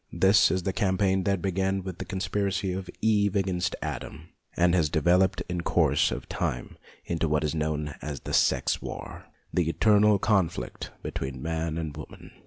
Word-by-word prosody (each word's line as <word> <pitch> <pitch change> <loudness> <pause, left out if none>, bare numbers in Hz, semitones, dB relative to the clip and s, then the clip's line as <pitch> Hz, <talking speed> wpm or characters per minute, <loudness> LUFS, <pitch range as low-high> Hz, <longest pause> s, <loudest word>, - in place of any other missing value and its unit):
This 95 +1 +5
is 95 -1 0
the 95 - -1
campaign 95 -1 +1
that 100 -4 0
began 95 0 0
with 95 -2 -7
the - - -4
conspiracy 95 0 -1
of 95 0 -5
Eve 105 -3 +3
against 90 -3 0
Adam, 80 +2 -6 0.3
and 85 0 +4
has 80 -5 +2
developed 90 +5 +2
in 90 -1 -2
course 75 -4 +2
of - - -5
time - - -3 0.3
into 80 -1 -1
what 75 0 +1
is 75 - -1
known 75 -2 -2
as 75 -2 -5
the - - -6
sex - - +2
war, - - -8 0.3
the 85 -3 +1
eternal 105 +3 +4
conflict 95 -4 -1
between 65 -1 -4
man 80 +2 -2
and 80 -3 -4
woman. - - -10
90 Hz, 170 wpm, -27 LUFS, 80-95 Hz, 0.3 s, This